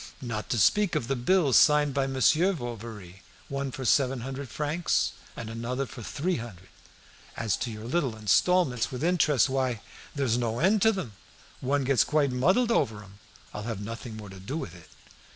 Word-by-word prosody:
"Not 115 -4 -5
to 125 - 0
speak 205 - +3
of 115 - -1
the 135 - 0
bills 140 +2 +3
signed 150 -2 +5
by 135 -1 0
Monsieur 155 +8 +3
Bovary, 115 - -8 0.3
one 140 0 -2
for 130 +1 -6
seven 130 0 +2
hundred 135 +1 -6
francs, 155 +3 0 0.3
and 115 - -6
another 120 +4 -3
for 135 -2 -10
three 170 - -2
hundred. 100 -6 -9 0.7
As 110 -2 0
to 120 - -3
your 110 0 -8
little 130 -3 -1
installments, 125 - +2
with 125 0 -5
the 165 - +2
interest, 150 -8 +3
why, 130 -3 -1 0.4
there's 130 -4 +1
no 115 -1 -1
end 195 - +3
to 220 - +6
'em; 120 - -6 0.5
one 140 +2 0
gets 135 -2 +3
quite 150 -3 +1
muddled 185 - +2
over 110 - 0
'em. 100 0 -17 0.3
I'll 105 - -5
have 110 -4 -4
nothing 115 0 -7
more 105 -2 -9
to 95 0 -11
do 125 +11 -5
with 100 - -6
it." 85 -2 -15
130 Hz, 190 wpm, -27 LUFS, 115-145 Hz, 0.7 s, to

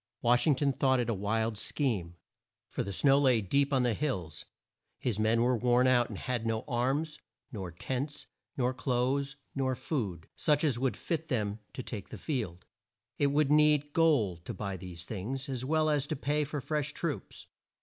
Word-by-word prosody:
Wash 120 +5 +4
ing 150 - +5
ton 140 +1 +1
thought 130 0 +2
it 120 -1 0
a - - +1
wild 110 +2 -1
scheme; 105 - -1 0.5
for - - -3
the 100 - -3
snow 135 +7 +4
lay 130 -5 +4
deep 140 +8 +1
on 130 -2 +3
the 120 -2 +2
hills, 95 - -3 0.5
his 115 -5 -1
men 110 +2 +3
were 125 +1 +3
worn 125 +2 +3
out, 125 -2 +4
and 105 - -6
had 125 +1 -2
no 115 -1 -1
arms, 140 +5 0 0.3
nor 95 -6 -5
tents, 130 - -4 0.3
nor 125 -1 +1
clothes, 130 +2 0 0.2
nor 130 -2 0
food, 100 - -3
such 150 -1 +2
as 135 -7 +2
would 130 0 0
fit 160 -2 -3
them 105 -6 -1
to 130 - -5
take 105 -6 -6
the - - -7
field. 110 - -3 0.5
It 145 - +4
would 145 0 +2
need 150 -1 +4
gold 115 - +3
to - - -5
buy 100 -2 -3
these 90 -2 -7
things, 120 +7 -4
as 130 -3 -3
well 155 +3 +2
as 145 -2 +1
to - - -2
pay 145 +2 0
for 145 0 -4
fresh 150 +2 -2
troops. 165 -5 -4
130 Hz, 190 wpm, -31 LUFS, 110-145 Hz, 0.5 s, ing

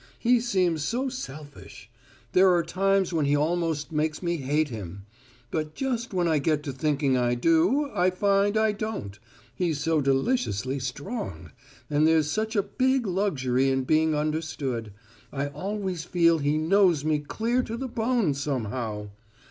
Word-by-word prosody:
He 245 +1 +3
seems 185 -9 0
so 255 - -1
selfish: 145 - -9 0.4
there 185 +1 +5
are 170 - +2
times 195 +2 +1
when 155 -3 +1
he 145 +1 +3
almost 160 -1 -1
makes 155 +2 -1
me 170 0 0
hate 145 +2 0
him; 100 -4 -8 0.5
but 155 -1 -3
just 245 -3 -2
when 180 -3 +1
I 160 -2 +2
get 150 +1 0
to 140 -3 -4
thinking 140 0 +1
I 120 -1 +1
do, 170 - +2
I 180 +1 +3
find 200 +2 +2
I 220 0 +3
don't 205 - -5 0.3
he's 160 +1 -1
so 160 0 +1
deliciously 135 - 0
strong, 125 - -5 0.4
and 150 +1 +2
there's 160 -2 +3
such 220 +1 -2
a 200 - +3
big 260 +5 +1
luxury 135 -10 +1
in 135 0 +1
being 155 +3 +2
understood: 150 -7 -2 0.4
I 140 0 -2
always 185 +2 -4
feel 170 -1 +3
he 145 +1 +1
knows 170 -2 +3
me 155 -1 +2
clear 225 +12 -1
to 230 -2 -5
the 265 +2 -4
bone, 230 - 0
somehow! 115 -6 -3
160 Hz, 155 wpm, -26 LUFS, 140-200 Hz, 0.5 s, there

